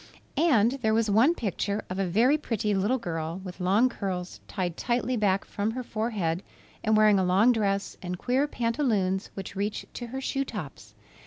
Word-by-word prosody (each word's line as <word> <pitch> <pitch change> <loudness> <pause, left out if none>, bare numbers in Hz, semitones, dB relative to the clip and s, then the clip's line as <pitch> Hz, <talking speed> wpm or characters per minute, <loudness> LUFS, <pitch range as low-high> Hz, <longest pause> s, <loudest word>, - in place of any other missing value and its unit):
And 270 -5 +3
there 220 -1 +2
was 225 -2 +2
one 245 +11 +5
picture 205 - -2
of 185 +1 -4
a 195 - +1
very 230 - +4
pretty 220 -8 -1
little 205 +7 +1
girl 165 -5 -4
with 180 -1 -8
long 195 +7 +4
curls 185 -6 -4
tied 175 -3 -3
tightly 245 +3 0
back 200 -3 +1
from 205 +1 -2
her 250 +3 -4
forehead 215 -8 -2 0.4
and 220 -1 +3
wearing 215 -2 +5
a - - +2
long 190 +7 +4
dress 200 -4 -1
and 180 -1 -4
queer 260 +9 +1
pantaloons 230 -8 0
which 195 0 -7
reached 205 +2 -3
to 240 - -6
her 265 +3 -5
shoe 270 +1 -1
tops. 140 - -8
210 Hz, 180 wpm, -27 LUFS, 190-240 Hz, 0.4 s, one